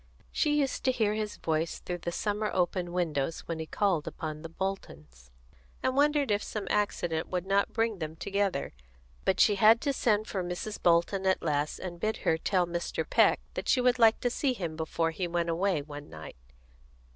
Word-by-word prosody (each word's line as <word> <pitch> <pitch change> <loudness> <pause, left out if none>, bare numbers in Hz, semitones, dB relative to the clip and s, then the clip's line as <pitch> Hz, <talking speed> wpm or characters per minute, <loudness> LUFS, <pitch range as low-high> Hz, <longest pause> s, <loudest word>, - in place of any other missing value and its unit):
She 295 -1 +1
used 270 -2 -2
to 260 - +5
hear 220 -4 +1
his 215 -1 -3
voice 160 0 -1
through 175 -1 -5
the 170 - -3
summer 210 +3 -1
open 175 -1 0
windows 165 -4 -1
when 165 -1 -5
he 160 - -5
called 185 -6 0
upon 155 -1 -5
the 165 - -7
Boltons, 75 - -6 0.5
and 260 - +1
wondered 290 -3 +3
if 205 0 +2
some 210 -2 -5
accident 175 -6 0
would 180 -1 -2
not 195 +1 +2
bring 225 -3 0
them 155 -1 -4
together, 200 -4 -1 0.5
but 190 - +2
she 205 -2 +5
had 220 +3 +6
to 285 -2 0
send 215 -4 +1
for 190 -4 -3
Mrs. 180 +4 -5
Bolton 175 +3 +2
at 190 - +2
last, 150 -1 0
and 175 -2 -7
bid 215 +4 -1
her 160 - +2
tell 185 0 +1
Mr. 170 0 -3
Peck - - +4
that - - -4
she 260 - +4
would 250 0 +3
like 225 -1 +6
to 245 - +1
see 265 +1 0
him 170 -8 -4
before 165 +1 -1
he 175 +2 -3
went 170 0 -1
away, 170 -2 +1
one 145 0 -9
night. 80 -1 -10
185 Hz, 195 wpm, -29 LUFS, 165-215 Hz, 0.5 s, had